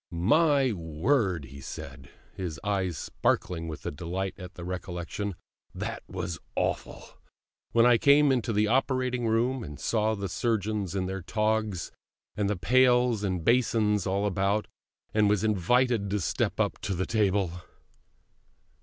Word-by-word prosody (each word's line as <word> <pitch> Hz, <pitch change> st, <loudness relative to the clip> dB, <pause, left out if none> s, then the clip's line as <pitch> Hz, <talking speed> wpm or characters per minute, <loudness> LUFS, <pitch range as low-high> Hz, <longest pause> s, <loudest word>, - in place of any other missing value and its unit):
"My 135 Hz, -, +3 dB
word," 90 Hz, -, 0 dB
he 70 Hz, +1 st, -11 dB
said, 70 Hz, -, -8 dB, 0.2 s
his 90 Hz, -5 st, -5 dB
eyes 95 Hz, -5 st, -1 dB
sparkling 80 Hz, +4 st, -1 dB
with 80 Hz, -2 st, -7 dB
delight 90 Hz, +5 st, -3 dB
at 90 Hz, -1 st, -10 dB
the 90 Hz, -, -8 dB
recollection, 90 Hz, +2 st, -4 dB, 0.4 s
"that -, -, -4 dB
was 85 Hz, -2 st, -4 dB, 0.2 s
awful, -, -, -2 dB, 0.7 s
when 115 Hz, 0 st, +5 dB
I 120 Hz, -2 st, +5 dB
came 145 Hz, 0 st, +5 dB
into 120 Hz, -3 st, 0 dB
the 105 Hz, 0 st, +2 dB
operating 125 Hz, 0 st, +1 dB
room, 120 Hz, +3 st, +1 dB
and 75 Hz, -5 st, -8 dB
saw 110 Hz, -1 st, +1 dB
the 100 Hz, -1 st, -3 dB
surgeons 105 Hz, -2 st, -1 dB
in 95 Hz, -1 st, 0 dB
their 95 Hz, +1 st, -4 dB
togs, 105 Hz, -1 st, -1 dB, 0.4 s
and 100 Hz, -1 st, 0 dB
the 105 Hz, -, -1 dB
pails 125 Hz, +2 st, +3 dB
and 90 Hz, -4 st, -2 dB
basins 110 Hz, -5 st, +2 dB
all 100 Hz, +2 st, 0 dB
about, 100 Hz, +1 st, 0 dB, 0.5 s
and 105 Hz, -1 st, +4 dB
was 105 Hz, 0 st, +2 dB
invited 110 Hz, +2 st, +2 dB
to 105 Hz, +1 st, 0 dB
step -, -, -1 dB
up -, -, 0 dB
to 95 Hz, -, -3 dB
the 95 Hz, +2 st, -1 dB
table!" 100 Hz, -5 st, 0 dB
105 Hz, 145 wpm, -28 LUFS, 90-115 Hz, 0.7 s, when